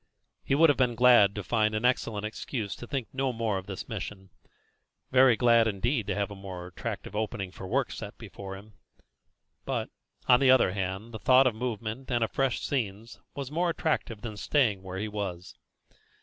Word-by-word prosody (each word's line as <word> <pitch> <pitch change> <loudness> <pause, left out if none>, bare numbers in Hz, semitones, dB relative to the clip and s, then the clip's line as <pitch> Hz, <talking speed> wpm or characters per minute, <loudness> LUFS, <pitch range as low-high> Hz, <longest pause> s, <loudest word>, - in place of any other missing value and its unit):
He 135 - +1
would 165 +2 +6
have 135 - -3
been 125 -2 +2
glad 120 -5 +6
to 105 - -4
find 110 0 +1
an 110 +3 -1
excellent 115 -4 0
excuse 110 -1 -4
to 120 - -9
think 130 -3 -3
no 135 0 0
more 115 -4 -1
of 95 - -12
this 95 -2 -6
mission 95 -4 -6 0.8
very 130 -2 +6
glad 115 -1 +4
indeed 110 +3 -1
to - - -1
have 100 0 -1
a - - -7
more 95 -2 -8
attractive 90 +3 -6
opening 105 -3 -3
for 95 - -9
work - - 0
set - - -7
before 95 -1 -8
him; 105 +2 -15 0.9
but, - - -3 0.4
on 125 - +7
the 135 - +4
other 130 -7 +5
hand, 95 +3 -4
the 110 - -7
thought 130 +3 +5
of 125 - +3
movement 115 +1 -4
and 120 -2 +1
of 115 - -2
fresh 135 -2 0
scenes 115 -4 -3 0.2
was 140 -1 -5
more 170 +3 +1
attractive 155 -10 -1
than 110 -3 -6
staying 110 -5 +1
where 95 0 -7
he 105 +3 -2
was. 100 -4 -5
110 Hz, 190 wpm, -28 LUFS, 100-125 Hz, 0.9 s, on